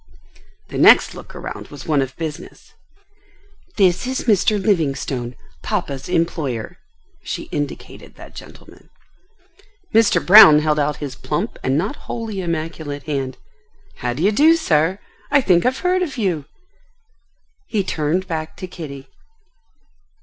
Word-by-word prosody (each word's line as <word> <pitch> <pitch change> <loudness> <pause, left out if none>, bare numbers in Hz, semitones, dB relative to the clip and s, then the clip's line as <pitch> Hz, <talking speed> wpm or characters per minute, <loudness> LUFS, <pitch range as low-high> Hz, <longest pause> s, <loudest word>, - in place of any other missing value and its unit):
The - - -4
next - - +6
look - - -12
around - - -7
was 145 -2 -11
one 150 -3 +2
of 135 0 -4
business. 160 -3 -8 1.0
"This 185 +2 +2
is 260 0 -2
Mr. 210 -2 +2
Livingstone, 135 - -1 0.3
papa's 160 -10 -3
employer." 155 -9 -2 0.4
She - - -5
indicated 145 -1 -6
that - - -13
gentleman. - - -14 1.0
Mr. 225 -2 +3
Brown 180 -6 +10
held 150 0 +1
out 150 0 0
his 145 -3 -6
plump - - -4
and 130 +2 +1
not 200 - -2
wholly 220 -4 -4
immaculate 155 -4 -4
hand. 135 -4 -3 0.6
"How 125 -1 -2
d'ye 170 +11 +1
do, 310 +9 +5
sir? 165 - +1 0.3
I 285 - +4
think 185 -6 +3
I've 255 - -1
heard 365 +1 +2
of 305 -7 -3
you?" 180 - -1 1.2
He 210 -3 -1
turned 165 +2 -1
back 160 -2 -5
to 185 - -6
Kitty. 145 -7 -9
165 Hz, 130 wpm, -20 LUFS, 145-205 Hz, 1.2 s, Brown